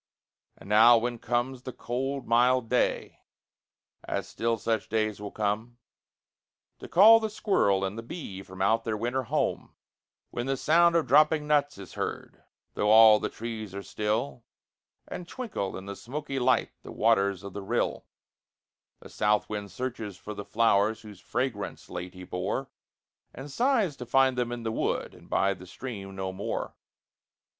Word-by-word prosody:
And - - -14
now, 115 +3 +7
when 120 +1 -2
comes 120 +2 -1
the 130 - -6
calm 130 +2 -4
mild 120 0 +3
day, 125 - 0 0.8
as - - -3
still 115 0 -1
such 110 -1 -2
days 110 -1 -1
will 105 - -5
come, 110 +4 -2 1.0
To - - -9
call 220 +6 +8
the 220 -1 -2
squirrel 100 - +1
and 100 +4 -4
the - - -4
bee 115 - -7
from 95 0 -6
out 115 +3 +2
their 115 -2 -2
winter 120 +4 -1
home; - - -2 0.6
When 120 +2 -4
the 135 0 0
sound 170 +4 +4
of 165 - +3
dropping 150 +1 +4
nuts 145 -3 +1
is 95 -3 -10
heard, - - -5 0.3
though 105 - 0
all 110 0 +8
the - - -2
trees 110 -4 -6
are 100 - -5
still, 110 +5 -2 0.6
And 175 - -7
twinkle 220 - -4
in 95 - -9
the 100 0 -6
smoky 140 +3 -5
light 125 - +2
the - - -10
waters 100 -4 +2
of 100 -1 -8
the 100 - -5
rill, 95 - -2 0.9
The - - -11
south 105 0 +1
wind 105 -1 -4
searches 110 -2 -5
for 105 +3 -8
the 105 - -6
flowers 110 0 +2
whose 105 -4 -12
fragrance 120 -4 -4
late 90 +1 -6
he 90 - -9
bore, 95 +9 -3 0.6
And 135 +2 -8
sighs 230 - +1
to 125 - -8
find 130 +1 +3
them 120 -1 -1
in 120 -1 -5
the 110 - -2
wood - - -2
and - - -17
by 100 0 +2
the 95 -1 -13
stream 100 -3 -7
no 95 0 -3
more. 95 +2 -4
115 Hz, 165 wpm, -28 LUFS, 100-130 Hz, 1.0 s, call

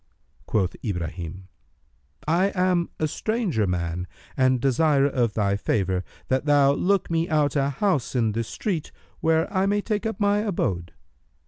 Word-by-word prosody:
Quoth 95 -4 0
Ibrahim, 90 -2 -4 0.8
"I 175 +5 +3
am 180 -2 +2
a 155 - +1
stranger 185 - -1
man 90 0 -2 0.3
and 130 -1 +3
desire 140 +2 +3
of 125 -6 0
thy 100 -2 +1
favour 95 -2 0 0.2
that 130 +2 0
thou 145 -2 +5
look 190 +3 +1
me 165 +1 +1
out 150 -3 +2
a 140 -1 +2
house 145 - 0
in 115 -3 +2
this 115 +1 -2
street 175 -8 -3 0.3
where 160 0 +2
I 190 0 +2
may 205 +1 +1
take 215 +1 -1
up 225 - -4
my 205 0 +3
abode." 95 - -2
140 Hz, 150 wpm, -25 LUFS, -, 0.8 s, thou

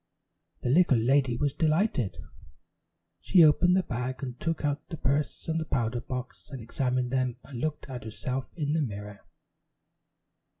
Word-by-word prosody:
The - - -1
little 155 -4 +5
lady 125 +1 +2
was 145 +1 0
delighted. 155 - +1 1.0
She 180 -3 +5
opened 175 +4 +5
the 190 - +2
bag 130 0 -4
and 125 -1 -5
took 165 -2 -1
out 145 0 -2
the 165 - -5
purse 140 +1 -1
and 160 0 0
powder 120 -1 0
box 125 +2 -7
and 135 -3 -7
examined 125 +2 -1
them 130 -2 0
and 125 -4 -7
looked 155 -1 -3
at 130 -2 -6
herself 125 +4 -4
in 150 -2 0
the 160 - +2
mirror. 105 -5 -5
130 Hz, 155 wpm, -28 LUFS, 125-150 Hz, 1.0 s, little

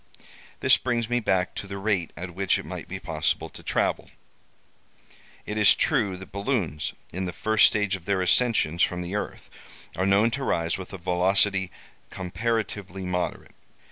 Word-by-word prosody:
This - - +6
brings 120 -2 -1
me 120 - +3
back 95 -5 +1
to 100 - -6
the 100 0 -6
rate 95 -4 0
at 90 +1 -6
which 95 +1 +2
it - - -7
might - - -7
be - - -5
possible - - -1
to - - -11
travel. - - -1 1.4
"It 105 +1 -3
is 105 - +7
true 95 -3 +1
that 95 - -11
balloons, 100 - -1 0.2
in 95 +2 -2
the 90 - -3
first 110 +6 +4
stage 105 -2 +1
of 90 -3 -10
their 100 -1 +1
ascensions 90 -4 +3
from 90 0 +1
the 90 +2 -6
earth, 105 - -4 0.5
are 95 +2 0
known 100 +4 +4
to 135 +3 -3
rise 85 -9 0
with 95 -2 -8
a 95 - -6
velocity 95 +2 +2 0.4
comparatively 95 -1 -3
moderate. 90 -1 -3
95 Hz, 170 wpm, -26 LUFS, 90-105 Hz, 1.4 s, is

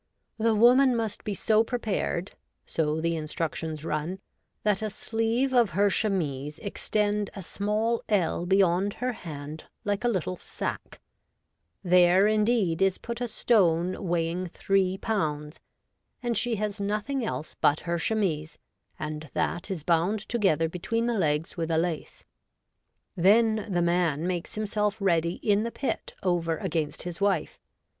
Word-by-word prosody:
' - - -51
The 225 0 +3
woman 250 +3 +6
must 225 -3 -2
be 205 - -3
so 220 +3 +3
prepared,' 215 -6 -2 0.3
so 155 -1 0
the 170 +1 0
instructions 160 0 -3
run, 155 +4 -2 0.2
' - - -50
that 210 -1 +2
a 215 - -1
sleeve 225 +5 0
of 230 -9 +3
her 200 0 +4
chemise 150 -9 -1
extend 210 0 -1
a 195 - -6
small 215 +5 -1
ell 175 -4 +1
beyond 190 +1 +3
her 250 +1 -2
hand 155 -6 -8 0.2
like 205 +1 -1
a - - +2
little 185 -5 -1
sack: - - -5 0.8
there 180 +1 +5
indeed 210 -5 +2
is 195 -1 +3
put 235 +1 -6
a 245 - 0
stone 185 -5 +2
weighing 170 +1 -1 0.2
iii 190 -1 +3
pounds; 155 -8 -2 0.6
and 240 -1 0
she 240 0 +1
has 210 0 -3
nothing 210 +7 -1
else 160 -8 -4
but 145 - +3
her 170 0 -2
chemise, 165 -6 -1 0.4
and 155 0 -5
that 175 - -1
is 180 -6 -4
bound 175 +6 +2
together 190 -9 +2
between 230 +8 -2
the 240 - +1
legs 160 -5 0
with 165 -1 -2
a 160 - +2
lace. 165 -1 -3 0.9
Then 215 +4 +4
the 175 -3 +1
man 170 -3 +1
makes 180 -2 -3
himself 210 -1 -1
ready 170 -4 +2
in 205 -1 +3
the 230 - -1
pit 270 +3 -4
over 170 -3 +1
against 160 -6 -2
his 175 +1 -6
wife. 195 -6 0
190 Hz, 150 wpm, -27 LUFS, 165-215 Hz, 0.9 s, woman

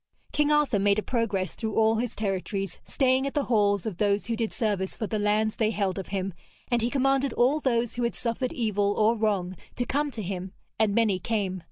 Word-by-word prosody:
King 295 0 +2
Arthur 295 -8 +3
made 200 +1 +3
a 215 - 0
progress 205 -7 -1
through 220 -2 -4
all 220 0 +4
his 240 +1 -2
territories, 195 -2 -3
staying 265 0 +2
at 275 - -5
the 290 - +2
halls 205 -5 +2
of 210 -6 -4
those 205 0 +1
who 230 - -1
did 225 -1 -2
service 205 -5 -1
for 220 - -3
the 215 0 -2
lands 210 +1 +1
they 220 -2 +2
held 200 -3 -1
of 190 - -6
him, 195 -1 -3 0.4
and 240 -1 +2
he 235 - +1
commanded 270 0 +1
all 265 +5 +3
those 240 -4 0
who 245 - -4
had 235 - 0
suffered 245 +2 -2
evil 205 -3 0
or 220 +2 +4
wrong 200 -5 0 0.2
to 245 - -1
come 290 +4 0
to 225 -6 -6
him, 185 0 -5 0.3
and 215 -2 +2
many 215 -5 +2
came. 195 -2 -1
220 Hz, 220 wpm, -27 LUFS, 200-240 Hz, 0.4 s, all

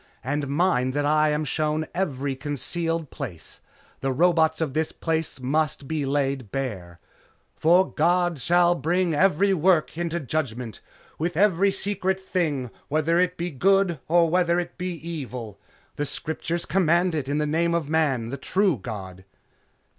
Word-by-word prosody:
And 145 +2 -2
mind 140 -4 +1
that 145 0 +1
I 155 +1 +3
am 150 +1 0
shown 155 +1 -1
every 140 -7 -2
concealed 160 +3 -2
place. 95 - -8 0.4
The 135 - -1
roots 160 +2 +3
of 155 -5 -1
this 160 +1 0
place 160 -3 -2
must 145 +2 -1
be 150 -2 -2
laid 135 -5 -1
bare. 95 -11 -4 0.6
'For 175 +4 +4
God 175 0 +2
shall 175 +2 +4
bring 175 0 0
every 195 +4 +3
work 175 -2 +2
into 170 0 -1
judgment, 125 - -4 0.4
with 170 +1 -2
every 200 0 +4
secret 190 -1 0
thing; 155 -10 -2 0.2
whether 155 +3 +1
it 180 0 +1
be 175 +1 -3
good 190 +2 +2
or 170 +1 +4
whether 175 +1 +2
it 175 - -5
be 180 0 -3
evil.' 125 - -6 0.4
The 145 - -1
Scriptures 165 +3 -3
command 175 -1 +2
it 145 -4 -2
in 145 - 0
the 150 - +1
name 170 +3 +1
of 165 -4 -1
Man, 145 -7 +1
the 140 - -4
True 185 - +1
God." 95 -4 -7
155 Hz, 155 wpm, -25 LUFS, 140-175 Hz, 0.6 s, For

